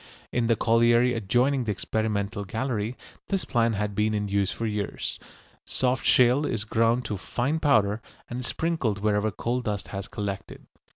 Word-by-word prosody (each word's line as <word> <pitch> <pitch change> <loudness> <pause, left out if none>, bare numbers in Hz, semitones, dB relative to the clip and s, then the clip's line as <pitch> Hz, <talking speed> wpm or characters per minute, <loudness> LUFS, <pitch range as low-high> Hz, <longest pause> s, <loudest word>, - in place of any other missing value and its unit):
In 120 -1 +1
the 115 - +4
colliery 120 +2 +4
adjoining 125 +5 +1
the 110 - 0
experimental 100 +1 -2
gallery 115 +2 -2 0.3
this 195 -3 -1
plan 115 -1 +2
had 105 0 -2
been 105 +1 +1
in 105 0 -1
use 100 -1 +1
for 115 - -4
years. 105 -2 -3 0.4
Soft 130 0 0
shale 125 +3 +5
is 110 -7 -1
ground 115 +3 +1
to 105 -2 -3
fine 125 +11 -1
powder, 110 -8 +3 0.3
and 120 - -5
is 125 - -4
sprinkled 160 -11 0
wherever 105 0 +2
coal 120 +4 -2
dust 105 -4 -3
has 100 -1 -5
collected. 100 -2 -5
115 Hz, 165 wpm, -26 LUFS, 105-125 Hz, 0.4 s, shale